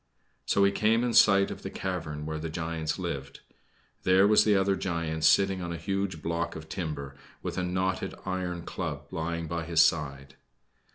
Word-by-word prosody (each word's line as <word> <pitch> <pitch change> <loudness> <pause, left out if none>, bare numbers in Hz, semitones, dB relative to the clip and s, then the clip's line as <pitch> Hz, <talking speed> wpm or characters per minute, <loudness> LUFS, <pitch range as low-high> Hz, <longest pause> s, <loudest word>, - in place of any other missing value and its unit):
Soon 100 - +4
he 100 - +4
came 110 +3 +2
in 120 -1 0
sight 100 -3 +6
of - - -7
the - - -5
cavern 80 -6 -4
where 80 0 -3
the 80 +1 -4
giants 80 -1 -3
lived. 70 -7 -5 0.6
There 95 +1 +5
was 105 0 +6
the 105 -2 +4
other 95 0 +2
giant 85 -4 -2
sitting 95 +4 +4
on 85 -1 -4
a 85 - -3
huge 95 -3 -3
block 85 +1 -2
of 80 0 -8
timber, 75 -6 -5 0.3
with - - -3
a 90 - -1
knotted 95 +1 -1
iron 90 -2 -3
club - - -4
lying 85 +1 -3
by 85 +1 -3
his 80 -1 +4
side. 70 -4 -1
85 Hz, 180 wpm, -28 LUFS, 80-95 Hz, 0.6 s, sight